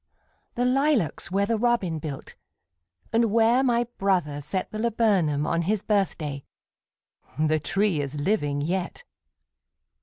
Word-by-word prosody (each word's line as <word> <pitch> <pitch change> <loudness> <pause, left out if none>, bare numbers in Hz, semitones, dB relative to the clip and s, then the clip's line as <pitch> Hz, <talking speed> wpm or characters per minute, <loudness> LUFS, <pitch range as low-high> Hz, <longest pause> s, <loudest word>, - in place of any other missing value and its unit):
The 245 - 0
lilacs 260 - +1
where 200 +2 +1
the 225 +1 0
robin 215 -9 +1
built, 145 -3 -7 0.8
And 230 +1 +4
where 230 +3 +4
my 240 -2 +2 0.2
brother 175 -7 0
set 185 +6 -4
The 215 - -5
laburnum 205 -10 +1
on 170 +1 0
his 205 +4 -1
birthday, 160 -9 -1 0.9
The 155 0 +2
tree 195 0 0
is 140 0 -5
living 145 -3 0
yet! 175 +4 -3
190 Hz, 125 wpm, -25 LUFS, 155-225 Hz, 0.9 s, And